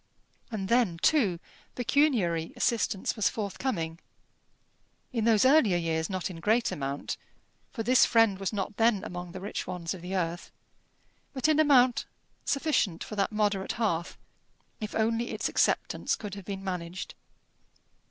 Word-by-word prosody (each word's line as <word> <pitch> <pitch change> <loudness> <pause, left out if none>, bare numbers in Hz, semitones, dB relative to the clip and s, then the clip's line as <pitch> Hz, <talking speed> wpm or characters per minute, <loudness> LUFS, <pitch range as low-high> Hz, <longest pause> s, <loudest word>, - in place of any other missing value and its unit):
And 205 -5 -4
then, 230 -7 +2
too, 210 - +3 0.4
pecuniary 235 - +1
assistance 210 -4 0
was 215 - +2
forthcoming 195 -6 -3 1.1
in 225 -3 0
those 225 0 +4
earlier 260 - +5
years 160 -1 -1
not 185 -2 -2
in 165 - -9
great 225 +6 +2
amount, 140 0 -3 0.5
for 225 - -4
this 250 +3 +5
friend 225 -4 +4
was 195 - -2
not 205 -1 -4
then 225 -3 +3
among 180 -3 -6
the 185 - -7
rich 200 +2 -5
ones 175 -1 -3
of 185 - -9
the 180 +2 -4
earth 175 -1 -2 0.8
but 270 +2 0
in 310 -1 +3
amount 260 -5 +5 0.4
sufficient 275 - +1
for 215 - -7
that 200 0 0
moderate 205 -2 0
hearth, 185 -7 -1 0.6
if 215 -1 -5
only 230 +2 +1
its - - -2
acceptance - - +1
could 205 -3 -7
have 200 -2 -8
been 195 0 -5
managed. 180 -1 -5
205 Hz, 145 wpm, -28 LUFS, 180-235 Hz, 1.1 s, earlier